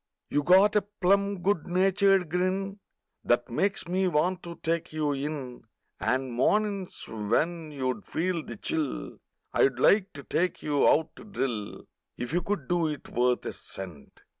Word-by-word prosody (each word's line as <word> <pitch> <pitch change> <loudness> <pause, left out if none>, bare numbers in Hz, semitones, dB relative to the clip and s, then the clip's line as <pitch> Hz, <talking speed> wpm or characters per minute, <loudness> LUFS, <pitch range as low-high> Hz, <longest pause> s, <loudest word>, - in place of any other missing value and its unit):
You 145 - +2
got 190 +7 +5
a 210 - +5
plum 200 -1 +1
good 195 -5 +1
natured 190 +1 +3
grin 190 +3 -1 0.4
That 120 0 +1
makes 195 +8 0
me 185 +2 +1
want 180 +3 +1
to 170 0 -8
take 165 0 -1
you 155 -2 0
in 140 -4 -4 0.3
And 130 -1 0
mornin's 200 - 0
when 155 +10 -1
you'd 130 -3 -3
feel 170 -1 -1
the - - -8
chill 155 -4 -3 0.3
I'd 135 -2 +3
love 195 - +4
to 140 - -8
take 180 +1 -1
you 145 -2 +3
out 160 +1 +2
to - - -10
drill 125 - -3 0.3
If 125 +4 -4
you 175 - +2
could 175 -7 -3
do 175 -2 +2
it 150 -2 -5
worth 125 +1 +1
a - - -3
cent! 90 -7 -10
170 Hz, 160 wpm, -28 LUFS, 135-190 Hz, 0.4 s, got